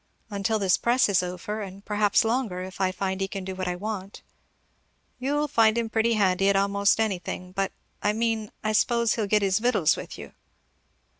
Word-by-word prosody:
"Until 200 +2 0
this 195 -3 +2
press 245 +2 +3
is 190 -2 +3
over; 210 +4 -5
and 195 0 -9
perhaps 210 0 +2
longer, 225 -6 -1
if 190 +1 -8
I 185 -1 +2
find 190 0 -3
he 195 - 0
can 195 -1 -6
do 190 - -4
what 185 0 -4
I 180 - -1
want." 200 0 -6 1.0
"You'll 290 +3 0
find 225 -4 +3
him 230 -1 -1
pretty 230 +1 +2
handy 195 -2 +2
at 200 - +3
a' 195 0 +3
most 200 +1 +2
anything; 185 -3 -2
but 195 +1 -1 0.3
I 205 - +2
mean, 220 -1 -1
I 215 - 0
s'pose 235 +1 +2
he'll 220 -3 -1
get 210 0 +2
his 190 0 +2
victuals 220 -9 +3
with - - -8
you." - - -10
205 Hz, 200 wpm, -26 LUFS, 190-225 Hz, 1.0 s, press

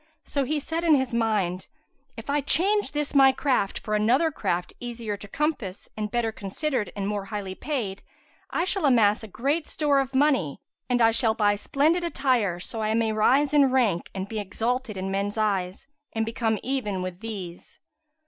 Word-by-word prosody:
So 280 -2 -1
he 300 +3 0
said 325 +3 -3
in 325 -3 +5
his 260 -3 0
mind, 210 -6 0 0.5
"If 225 - -8
I 285 +1 +1
change 400 +8 +2
this 295 -1 -2
my 270 -1 +7
craft 260 -7 0
for 215 - -4
another 245 +10 +3
craft 180 - -2
easier 235 -3 -4
to 205 - -10
compass 255 -7 -3
and 215 -1 -3
better 230 0 0
considered 220 +4 -3
and 200 -1 -2
more 205 -1 -2
highly 200 -2 -5
paid, 205 -6 -3 0.5
I - - 0
shall 370 -4 +1
amass 220 -5 +4
great 290 - -1
store 290 -3 +2
of 270 0 -2
money 265 - +2 0.3
and 245 -1 +3
I 225 - +6
shall 225 -1 +2
buy 205 -2 +3
splendid 305 - +1
attire, 255 - +1
so 220 +5 -5
I 215 0 0
may 225 -1 +1
rise 270 +7 +3
in 285 -2 +5
rank 235 -10 +1
and 190 0 -3
be 220 +1 -4
exalted 225 +3 -2
in 190 +1 -3
men's 200 +2 -2
eyes 195 -4 -1 0.3
and 225 0 0
become 225 -1 0
even 210 -8 -2
with 185 -1 -5
these." 195 -6 -8
225 Hz, 180 wpm, -26 LUFS, 205-275 Hz, 0.5 s, my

